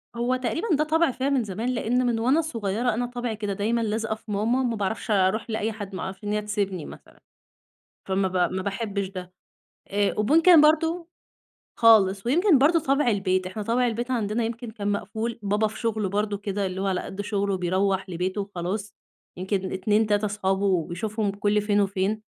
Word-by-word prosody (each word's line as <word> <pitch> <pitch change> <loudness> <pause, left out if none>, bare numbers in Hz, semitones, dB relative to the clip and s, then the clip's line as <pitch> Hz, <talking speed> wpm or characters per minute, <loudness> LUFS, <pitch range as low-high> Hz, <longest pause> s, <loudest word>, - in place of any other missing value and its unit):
هو 240 +2 0
تقريبًا 260 - -2
ده 305 - +2
طبع 320 -1 +2
فيّ 265 +3 -2
من 265 -4 +2
زمان، 215 +5 -3
لإن 245 +1 0
من 235 -2 +1
وأنا 265 +8 +3
صغيّرة 230 -5 -1
أنا 245 +2 -1
طبعي 245 -2 -4
كده 205 -2 -3
دايمًا 225 +4 0
لازقة 220 0 -1
في 215 -1 -11
ماما 230 +6 +1
ما 235 -2 0
باعرفش 210 +2 -3
أروح 200 +3 +2
لأي 220 0 -1
حد، 205 -3 -7
ما - - -5
أعرفش 190 +2 -7
إن 205 - -2
هي 210 - 0
تسيبني 200 -5 -2
مثلًا، - - -13 0.9
فما 190 0 +1
ب 180 -1 +1
ما 190 - -2
باحبش 200 0 -3
ده، 185 -1 -8 0.5
آآ، 205 0 +1
وممكن 320 - +6
برضو 325 +3 +2 0.7
خالص 205 -3 +5
ويمكن 330 - +4
برضو 320 +5 +4
طبع 275 -1 +1
البيت، 185 -3 +1
إحنا 205 +3 -5
طبع 245 +3 +1
البيت 240 +3 -3
عندنا 225 -1 0
يمكن 230 0 -4
كان 205 -2 -3
مقفول، 220 +3 -3
بابا 205 +2 +1
في 220 - -9
شغله 220 -4 -1
برضو 205 0 -1
كده 200 0 -3
اللي 190 +1 -3
هو 195 - -1
على 185 -1 0
قد 195 +1 -6
شغله 200 -2 -1
بيروح 190 +2 0
لبيته 185 +3 -2
وخلاص، 195 +2 -5 0.4
يمكن 190 0 -2
2، 210 +3 +1
3 205 0 +1
أصحابه 190 -4 0
بيشوفهم 210 +3 -2
كل 205 +1 +1
فين 205 0 +2
وفين. 200 +2 -1
210 Hz, 190 wpm, -25 LUFS, 195-235 Hz, 0.9 s, وممكن